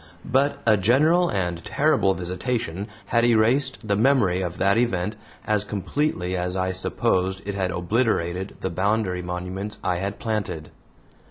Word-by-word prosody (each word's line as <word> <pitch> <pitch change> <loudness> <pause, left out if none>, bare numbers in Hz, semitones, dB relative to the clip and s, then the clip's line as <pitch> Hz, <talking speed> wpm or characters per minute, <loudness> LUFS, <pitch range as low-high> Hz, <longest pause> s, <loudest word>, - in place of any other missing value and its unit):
But 135 +3 +1
a 110 -2 +5
general 155 - +4
and 85 -3 -2
terrible 140 -10 +2
visitation 90 +1 -3 0.2
had 115 0 +2
erased 120 +2 +2
the 100 - +2
memory 105 -6 +3
of 90 -1 -4
that 100 +1 +3
event 105 -4 0 0.3
as 105 -1 +2
completely 100 - -2
as 90 0 -2
I 95 0 0
supposed 95 +1 0
it 100 - -2
had 95 -2 -1
obliterated 90 -1 -1
the - - -2
boundary 95 0 0
monuments 90 +4 -5
I 90 -1 0
had 100 +3 -3
planted. 105 -9 -3
100 Hz, 145 wpm, -24 LUFS, 90-115 Hz, 0.3 s, a